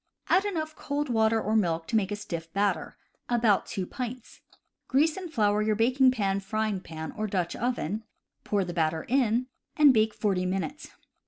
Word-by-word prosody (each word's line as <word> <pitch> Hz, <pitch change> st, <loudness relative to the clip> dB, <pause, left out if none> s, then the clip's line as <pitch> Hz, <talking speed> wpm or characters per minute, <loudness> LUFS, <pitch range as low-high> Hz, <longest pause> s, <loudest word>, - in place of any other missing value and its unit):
Add 380 Hz, +3 st, +4 dB
enough 315 Hz, -6 st, -3 dB
cold 290 Hz, 0 st, -3 dB
water 225 Hz, -1 st, +3 dB
or 215 Hz, 0 st, -1 dB
milk 165 Hz, -6 st, +1 dB
to 230 Hz, -, -1 dB
make 205 Hz, -2 st, +1 dB
a -, -, 0 dB
stiff 170 Hz, -5 st, -6 dB
batter 195 Hz, -6 st, 0 dB, 0.3 s
(about 230 Hz, -4 st, +3 dB
2 190 Hz, -, -3 dB
pints). 250 Hz, +3 st, -7 dB, 0.5 s
Grease 300 Hz, +4 st, +3 dB
and 370 Hz, -3 st, -7 dB
flour 210 Hz, -6 st, +2 dB
your 215 Hz, 0 st, +1 dB
baking 255 Hz, +4 st, +4 dB
pan, 200 Hz, -6 st, 0 dB
frying 215 Hz, 0 st, -1 dB
pan, 160 Hz, -2 st, -7 dB
or 215 Hz, 0 st, -2 dB
Dutch 180 Hz, -4 st, -1 dB
oven, 220 Hz, -4 st, -2 dB, 0.4 s
pour 200 Hz, -2 st, 0 dB
the 175 Hz, -, -5 dB
batter 160 Hz, -1 st, 0 dB
in, 250 Hz, -2 st, +2 dB, 0.3 s
and 295 Hz, -3 st, +7 dB
bake 220 Hz, -1 st, +2 dB
forty 185 Hz, -4 st, 0 dB
minutes. 195 Hz, +11 st, -3 dB
215 Hz, 175 wpm, -28 LUFS, 190-255 Hz, 0.5 s, and